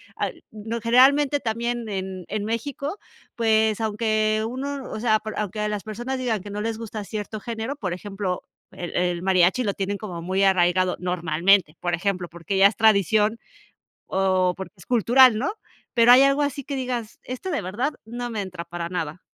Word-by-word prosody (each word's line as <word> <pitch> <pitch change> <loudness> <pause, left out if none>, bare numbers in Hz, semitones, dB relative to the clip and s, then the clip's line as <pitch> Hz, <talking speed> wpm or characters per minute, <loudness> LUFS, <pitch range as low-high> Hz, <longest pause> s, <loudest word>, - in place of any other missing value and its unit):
ah, - - -1
n 220 +2 -7
generalmente, 275 +5 +4
también 235 0 -2
en 190 -2 -4
en 205 0 -2
México, 280 - -3 0.4
pues, 220 -1 +2
aunque 215 0 +1
uno, 270 +2 -5
o - - -5
sea, 215 -2 +3
por 215 0 -7
aunque 210 +1 -2
las 210 -1 -3
personas 240 +5 -4
digan 235 -5 -1
que 205 - -9
no 210 +1 -3
les 225 0 -2
gusta 220 -2 -6
cierto 210 +1 -5
género, 230 +4 -4
por 200 -11 -4
ejemplo, 195 0 -4 0.3
el 175 - -7
el 175 -1 0
mariachi 185 +5 +3
lo 200 -4 0
tienen 200 +1 -2
como 180 -6 -6
muy 190 +3 0
arraigado, 185 -1 +3
normalmente, 180 0 +2
por 175 0 -2
ejemplo, 180 0 -2
porque 175 +3 -4
ya 195 +1 +8
es 205 - -3
tradición, 215 0 +3 0.7
o 185 -1 +1
porque 190 +2 -8
es 180 - -16
cultural, 245 0 +5
¿no? 275 - -1 0.4
Pero, 240 0 +7
¿hay 260 +2 +8
algo 275 +1 +3
así 285 -1 -2
que 280 - -4
digas: 245 -4 -4
"Este 255 +9 -5
de 290 - -1
verdad 235 +11 -2
no 240 +2 -5
me 220 -2 -3
entra 180 -3 -7
para 170 0 -5
nada"? 165 -2 -4
215 Hz, 185 wpm, -24 LUFS, 185-235 Hz, 0.7 s, ya